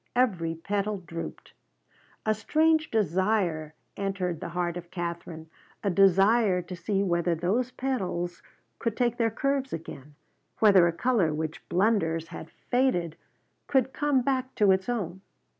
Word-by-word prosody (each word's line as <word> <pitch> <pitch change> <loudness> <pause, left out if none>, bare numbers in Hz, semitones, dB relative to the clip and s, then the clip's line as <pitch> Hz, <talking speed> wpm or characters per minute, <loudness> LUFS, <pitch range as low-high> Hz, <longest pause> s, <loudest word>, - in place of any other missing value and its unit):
Every 180 -10 +1
petal 200 +4 -2
drooped. 170 -2 -8 0.7
A 215 - +3
strange 310 +8 +2
desire 185 -5 0 0.2
entered 190 -4 -2
the - - -5
heart 175 0 -2
of 175 -1 -8
Katherine: 170 -2 -5 0.4
a 200 - +1
desire 195 +1 +4
to 180 +1 -7
see 195 +3 -1
whether 170 -2 +1
those 205 +10 0
petals 185 -10 -3 0.4
could 230 -2 -2
take 240 -1 +1
their 230 -1 +2
curves 275 +3 -1
again, 150 -3 -8 0.4
whether 195 -5 +6
a - - +1
color 180 -5 +1
which 160 +1 -5
blunders 170 -5 +1
had 165 - -8
faded 210 -11 0 0.5
could 265 -1 +2
come 290 -3 +1
back 260 0 -1
to 205 -2 +4
its 190 +3 +1
own. 190 -6 -3
195 Hz, 140 wpm, -27 LUFS, 170-235 Hz, 0.7 s, whether